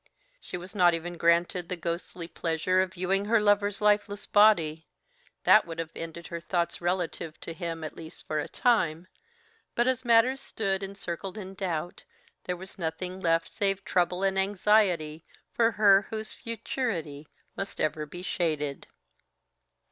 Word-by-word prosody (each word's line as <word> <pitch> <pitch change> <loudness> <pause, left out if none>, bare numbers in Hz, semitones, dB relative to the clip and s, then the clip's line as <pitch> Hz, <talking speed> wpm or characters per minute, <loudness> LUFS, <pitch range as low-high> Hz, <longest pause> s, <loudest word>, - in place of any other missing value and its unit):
She 180 - -6
was 180 +2 -9
not 175 -4 +5
even 175 +1 -5
granted 170 +1 +2
the 180 - -1
ghostly 170 0 -4
pleasure 170 +3 0
of 185 0 -3
viewing 190 +2 0
her 225 +2 +4
lover's 205 0 +2
lifeless 205 0 +2
body, 165 -7 +4 0.6
that 215 - +6
would 165 -1 -6
have 165 -1 -4
ended 165 +1 -7
her 170 - -5
thoughts 170 0 -2
relative 175 -2 -2
to 165 - -6
him, 165 -1 -5
at 155 - -6
least 160 -1 -11
for 155 - -1
a - - -3
time, 180 -9 +1 0.7
but 240 - +3
as 260 0 +1
matters 245 +3 +4
stood 195 -6 -2
encircled 195 0 -5
in 190 -2 -7
doubt, 175 -3 -4 0.4
there 180 -1 -2
was 190 +2 -11
nothing 180 +3 -4
left 165 -2 +2
save 195 -2 -1
trouble 180 +1 +1
and 195 0 +2
anxiety 190 -6 +2 0.3
for 230 -1 +3
her 200 -2 +5
whose 220 -1 -4
futurity 200 - -4 0.3
must 195 - -5
ever 155 0 -1
be 175 +4 -9
shaded. 155 -6 -2
180 Hz, 155 wpm, -28 LUFS, 165-205 Hz, 0.7 s, that